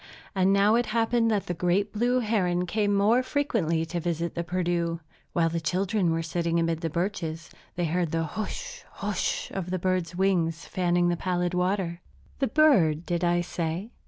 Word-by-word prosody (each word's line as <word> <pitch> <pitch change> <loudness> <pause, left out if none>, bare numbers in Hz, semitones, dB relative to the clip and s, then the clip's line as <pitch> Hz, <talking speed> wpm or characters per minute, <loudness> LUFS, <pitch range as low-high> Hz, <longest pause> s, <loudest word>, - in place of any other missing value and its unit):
And 190 -1 +3
now 200 +2 +4
it 240 0 +2
happened 230 0 +2
that 210 -3 0
the 175 - -2
great 180 +4 0
blue 245 +4 +2
heron 180 -6 +1
came 205 +3 0
more 205 +5 +4
frequently 225 - 0
to 175 +2 -3
visit 170 0 -2
the 170 - -2
Perdu. 170 -1 -1 0.3
While 165 -1 +2
the 165 0 -2
children 185 +2 0
were 165 0 0
sitting 170 +1 0
amid 165 -1 0
the 165 - -1
birches, 170 -1 -3 0.2
they 175 - 0
heard 170 +1 0
the 165 +1 0
hush! 350 - -5
hush! - - -2
of 185 -2 -4
the 185 - -1
bird's 180 -1 -1
wings 175 -3 +1
fanning 175 -1 +1
the 175 - 0
pallid 180 -1 -1
water. 180 -1 -1 0.4
The 270 - +2
bird, 195 - +4
did 175 -1 -1
I 175 0 +2
say? 175 +4 -3
180 Hz, 180 wpm, -27 LUFS, 170-205 Hz, 0.4 s, now